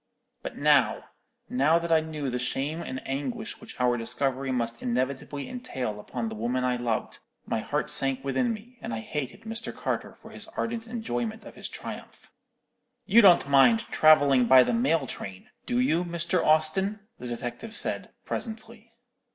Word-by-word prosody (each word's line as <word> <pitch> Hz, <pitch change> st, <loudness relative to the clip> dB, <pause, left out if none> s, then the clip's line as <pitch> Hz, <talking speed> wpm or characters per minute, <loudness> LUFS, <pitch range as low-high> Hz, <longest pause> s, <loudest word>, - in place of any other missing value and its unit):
But -, -, -7 dB
now, 145 Hz, -6 st, +3 dB, 0.4 s
now 145 Hz, +6 st, +3 dB
that 170 Hz, 0 st, -3 dB
I 160 Hz, -, +6 dB
knew 155 Hz, -4 st, -4 dB
the 125 Hz, -, -2 dB
shame 140 Hz, +6 st, -2 dB
and 130 Hz, -5 st, -6 dB
anguish 215 Hz, -, -4 dB
which 225 Hz, -9 st, -12 dB
our 125 Hz, -1 st, +3 dB
discovery 130 Hz, +3 st, -1 dB
must 115 Hz, -2 st, -2 dB
inevitably 130 Hz, +3 st, -2 dB
entail 130 Hz, -, -4 dB
upon 115 Hz, +2 st, -4 dB
the 110 Hz, -, -5 dB
woman 120 Hz, +4 st, -1 dB
I 125 Hz, -1 st, +1 dB
loved, 120 Hz, -2 st, -2 dB, 0.3 s
my -, -, -1 dB
heart 150 Hz, +6 st, -2 dB
sank 135 Hz, -3 st, +2 dB
within 235 Hz, -, +1 dB
me, 235 Hz, +3 st, -9 dB
and 115 Hz, -, -4 dB
I -, -, -3 dB
hated 135 Hz, +2 st, -5 dB
Mr. 225 Hz, +1 st, -3 dB
Carter -, -, -3 dB
for -, -, -14 dB
his -, -, -6 dB
ardent 230 Hz, 0 st, -2 dB
enjoyment 225 Hz, -1 st, -3 dB
of -, -, -10 dB
his -, -, -6 dB
triumph. -, -, -9 dB, 0.7 s
"'You 230 Hz, +4 st, +6 dB
don't 180 Hz, -8 st, +6 dB
mind 140 Hz, -, +5 dB
travelling 140 Hz, -5 st, +5 dB
by 130 Hz, 0 st, +8 dB
the -, -, -1 dB
mail 230 Hz, -, +2 dB
train, 95 Hz, -6 st, -7 dB, 0.2 s
do 245 Hz, -, 0 dB
you, 180 Hz, -9 st, +2 dB
Mr. 170 Hz, +1 st, 0 dB
Austin?' 160 Hz, +7 st, +2 dB, 0.2 s
the 125 Hz, -, -6 dB
detective 120 Hz, -, -5 dB
said, -, -, -1 dB, 0.2 s
presently. 225 Hz, 0 st, -6 dB
145 Hz, 165 wpm, -27 LUFS, -, 0.7 s, by